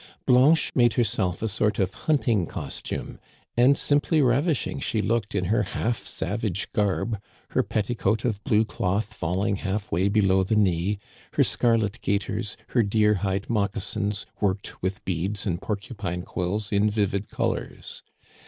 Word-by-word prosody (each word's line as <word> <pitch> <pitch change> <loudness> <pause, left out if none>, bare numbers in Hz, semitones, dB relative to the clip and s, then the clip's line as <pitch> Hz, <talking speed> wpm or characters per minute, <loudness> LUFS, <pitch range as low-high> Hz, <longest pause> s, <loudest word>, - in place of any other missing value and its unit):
Blanche 135 +6 +5
made 120 -2 +4
herself 100 -5 0
a - - +1
sort 105 0 0
of 95 -1 0
hunting 115 - +1
costume; - - -5 0.4
and 125 +4 +5
simply 145 +2 +2
ravishing 140 +3 +1
she 110 - -1
looked 110 -1 0
in 90 -2 +1
her 105 +4 +2
half 110 +4 -1
savage 100 0 -2
garb, 105 +1 0 0.3
her - - +3
petticoat 110 +1 -1
of 105 -4 -1
blue 110 +1 +3
cloth 105 +1 -1
fall 90 0 -1
ing 105 -3 +1
half 100 +2 -3
way 90 +4 +2
below 95 -2 +3
the 100 +4 0
knee, 95 -1 +2 0.4
her - - +4
scarlet 115 -4 +1
gaiters, 100 +1 -1
her 120 - +3
deer 105 0 +3
hide 95 0 -1
moccasins 105 -1 -1
worked 100 -1 -2
with 95 +1 -3
beads 95 +4 -1
and 90 -2 -1
porcupine 100 -4 -4
quills 100 +4 -3
in 105 +1 +3
vivid 100 -1 -1
colors. - - -3
105 Hz, 150 wpm, -25 LUFS, 95-115 Hz, 0.4 s, Blanche